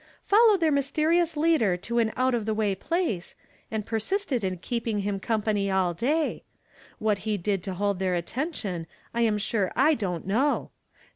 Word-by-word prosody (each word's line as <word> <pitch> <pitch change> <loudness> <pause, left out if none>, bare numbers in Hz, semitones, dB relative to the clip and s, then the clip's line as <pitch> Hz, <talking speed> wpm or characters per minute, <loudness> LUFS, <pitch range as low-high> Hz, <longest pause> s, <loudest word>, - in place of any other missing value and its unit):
wed 430 -1 +6
their 325 -2 +3
niysterions 310 +4 +2
U'ader 295 - +2
to 235 +6 -1
an 225 -1 +2
out 255 0 +2
of 225 -3 -1
the 220 - 0
uay 210 -3 +1
phiee, 265 - -2 0.3
and 215 -2 -3
pei 225 - -1
sisted 270 - -1
in 185 -1 -1
keepin.tr 230 +2 -2
him 200 -1 -2
company 210 -2 0
all 190 -2 +1
day. 295 - 0 0.5
What 210 -1 -1
lie 215 - +1
did 195 0 -1
to 185 0 -5
hold 200 0 0
their 185 -1 +1
attention, 190 - -3 0.3
j 235 -1 +3
am 210 -1 +1
sure 205 -2 0
I 290 +5 +5
don't 185 - -3
know. 250 +10 +1
220 Hz, 180 wpm, -27 LUFS, 195-280 Hz, 0.5 s, wed